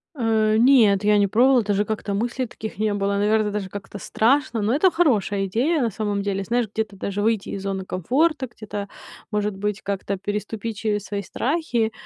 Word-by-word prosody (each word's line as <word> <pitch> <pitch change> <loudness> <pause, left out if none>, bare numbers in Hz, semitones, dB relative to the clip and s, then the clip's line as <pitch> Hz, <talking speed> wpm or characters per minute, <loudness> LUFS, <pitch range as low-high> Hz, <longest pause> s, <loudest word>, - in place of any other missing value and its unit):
Э, 220 -4 +2
нет, 225 -5 +5
я 210 0 +5
не 200 - +3
пробовала, 245 +4 +4
даже 205 0 0
как-то 215 -1 -3
мыслей 240 +5 -1
таких 220 -1 -8
не 215 0 0
было. 200 0 0
Наверное, 210 +1 +2
даже 200 -2 -3
как-то 205 +1 -8
страшно. 235 +4 +1
Но 215 +3 +1
это 365 +5 +4
хорошая 215 - +1
идея 260 - +1
на 235 - +1
самом 205 -1 -2
деле. 195 -1 -2
Знаешь, 235 +1 0
где-то 215 -2 -3
даже 200 +1 -3
выйти 220 -1 0
из 195 - -4
зоны 195 -1 -3
комфорта, 265 - 0
где-то, 205 -3 -7 0.4
может 210 -1 -1
быть 205 +1 -2
как-то 200 0 -3
переступить 210 +2 -4
через 210 -1 -1
свои 200 +1 -3
страхи. 240 - -1
210 Hz, 185 wpm, -23 LUFS, 200-235 Hz, 0.4 s, нет